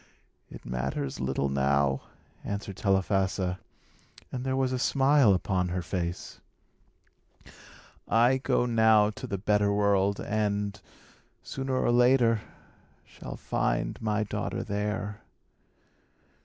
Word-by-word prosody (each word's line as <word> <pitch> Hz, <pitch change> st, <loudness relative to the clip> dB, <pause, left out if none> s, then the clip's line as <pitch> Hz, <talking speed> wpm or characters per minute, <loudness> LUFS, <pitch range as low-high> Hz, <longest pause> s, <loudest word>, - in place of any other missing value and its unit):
"It -, -, -12 dB
matters 65 Hz, +3 st, -3 dB
little 65 Hz, +1 st, -1 dB
now," 70 Hz, 0 st, +1 dB, 0.4 s
answered 100 Hz, -1 st, -5 dB
Telephassa, 95 Hz, -1 st, 0 dB, 0.7 s
and 125 Hz, -1 st, -4 dB
there 130 Hz, 0 st, -1 dB
was 130 Hz, -1 st, 0 dB
a 130 Hz, -, -1 dB
smile 135 Hz, -5 st, +4 dB
upon 90 Hz, 0 st, -1 dB
her 90 Hz, 0 st, -3 dB
face. 90 Hz, -2 st, -4 dB, 1.7 s
"I 120 Hz, +4 st, +4 dB
go 125 Hz, -, +1 dB
now 110 Hz, -3 st, +4 dB
to 130 Hz, +4 st, -8 dB
the 100 Hz, -4 st, -3 dB
better 105 Hz, +1 st, +2 dB
world, 100 Hz, -1 st, +2 dB
and, 105 Hz, -1 st, -2 dB, 0.6 s
sooner 135 Hz, -1 st, -3 dB
or 130 Hz, -, +2 dB
later, 120 Hz, -2 st, +4 dB, 0.6 s
shall -, -, -9 dB
find -, -, -2 dB
my 110 Hz, -1 st, 0 dB
daughter 105 Hz, -, -3 dB
there." 105 Hz, +1 st, -3 dB
105 Hz, 110 wpm, -28 LUFS, 90-115 Hz, 1.7 s, smile